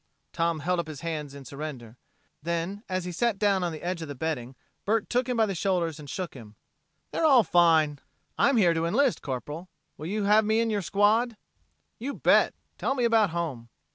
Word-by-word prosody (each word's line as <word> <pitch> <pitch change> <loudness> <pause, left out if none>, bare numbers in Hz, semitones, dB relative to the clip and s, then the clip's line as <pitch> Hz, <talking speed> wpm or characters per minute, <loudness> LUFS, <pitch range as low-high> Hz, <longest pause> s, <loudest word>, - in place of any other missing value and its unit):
Tom 165 -2 0
held 180 +3 0
up 170 - -2
his 155 -3 -8
hands 155 -4 -4
in 140 -1 -10
surrender; 130 -4 -7 0.5
then, 170 +5 -3
as 185 -1 -2
he 180 - -4
sat 230 +4 0
down 195 -2 +2
on 175 - -1
the 155 - -8
edge 175 -1 -2
of 160 - -5
the 145 - -6
bedding, 130 -3 -3 0.3
Bert 220 +1 0
took 250 +1 +1
him 250 - 0
by 225 - +4
the 200 - -2
shoulders 170 -4 -1
and 145 -2 -10
shook 180 0 -4
him. 110 -5 -12 0.6
"They're - - -2
all 270 -7 +6
fine. 160 -5 +3 0.4
I'm 275 -3 +3
here 180 -6 +5
to 165 0 0
enlist, 255 +7 +2
Corporal. 145 +7 -5 0.3
Will 155 - -6
you 210 +3 -1
have 210 +2 +5
me 220 +1 +2
in 230 -1 +1
your 205 -1 0
squad?" 215 +5 +2 0.6
"You 275 +5 -4
bet! - - +3 0.2
Tell 270 - 0
me 250 - 0
about 225 -3 +4
home." 155 -9 -4
175 Hz, 205 wpm, -27 LUFS, 155-215 Hz, 0.6 s, all